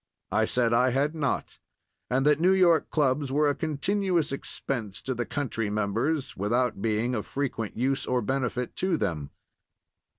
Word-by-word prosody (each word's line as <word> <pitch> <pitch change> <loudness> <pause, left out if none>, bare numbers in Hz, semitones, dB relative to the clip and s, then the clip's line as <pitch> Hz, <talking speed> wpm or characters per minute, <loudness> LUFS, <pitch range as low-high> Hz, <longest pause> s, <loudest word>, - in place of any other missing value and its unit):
I 110 +1 +3
said 120 0 +2
I 125 +2 +4
had 140 +4 +1
not, 150 -4 -2 0.5
and 130 +2 +1
that 150 0 +4
New 180 +3 +4
York 175 -4 +4
clubs 140 -2 +1
were 150 +2 +3
a 145 - +3
continuous 170 +2 0
expense 120 -6 -4
to 130 - -1
the 120 -1 -3
country 115 -6 -2
members 115 +9 -1
without 115 +2 0
being 115 +3 0
of 110 -4 -3
frequent 130 -6 -3
use 135 +3 0
or 125 -2 +1
benefit 125 0 -2
to 185 -3 +1
them. 80 - -2
130 Hz, 160 wpm, -27 LUFS, 115-150 Hz, 0.5 s, I